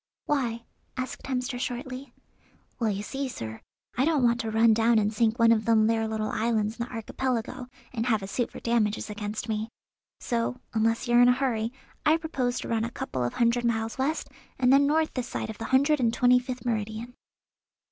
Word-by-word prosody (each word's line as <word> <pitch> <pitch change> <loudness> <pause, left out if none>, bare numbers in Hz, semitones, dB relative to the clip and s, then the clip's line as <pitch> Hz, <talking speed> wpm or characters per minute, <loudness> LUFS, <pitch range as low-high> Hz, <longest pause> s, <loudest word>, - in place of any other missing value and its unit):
"Why?" 235 -5 -1 0.3
asked 255 0 -4
Hemster 250 -1 -2
shortly. 255 +1 -5 0.7
"Well, 230 -2 +1
you 200 0 -2
see, 270 +5 -3
sir, 110 - -7 0.3
I 255 - +2
don't 300 -3 +2
want 235 0 +3
to 225 -2 -2
run 225 +1 +5
down 225 +1 +3
and 210 0 +2
sink 225 +1 +2
one 230 -1 +5
of 220 -1 +2
them 225 -2 +4
there 225 0 +1
little 220 -1 -2
islands 220 0 0
in - - 0
the - - -14
Archipelago, 245 +1 -3 0.3
and 230 0 -2
have 220 -4 +2
a - - -5
suit 240 +4 -1
for - - -9
damages 220 -2 0
against 210 +1 -4
me; 220 0 -2 0.5
so, 235 +1 -1
unless 225 +2 +1
you're 240 0 +5
in 245 - +7
a - - +6
hurry 240 -4 -1 0.3
I 315 +1 +4
propose 265 -7 -2
to - - -6
run 225 -1 0
a 230 - -2
couple 235 - -4
of 120 - -2
hundred 235 0 +2
miles 225 0 -1
west, 295 +4 -1 0.3
and 255 0 +4
then 280 +1 +5
north 315 +2 +2
this 255 -2 -3
side 220 - -4
of 220 - -12
the 225 - -4
hundred 280 +4 +3
and 235 -3 +2
twenty 250 +1 +4
fifth 250 -1 -6
meridian." 220 +1 -3
235 Hz, 205 wpm, -27 LUFS, 220-255 Hz, 0.7 s, in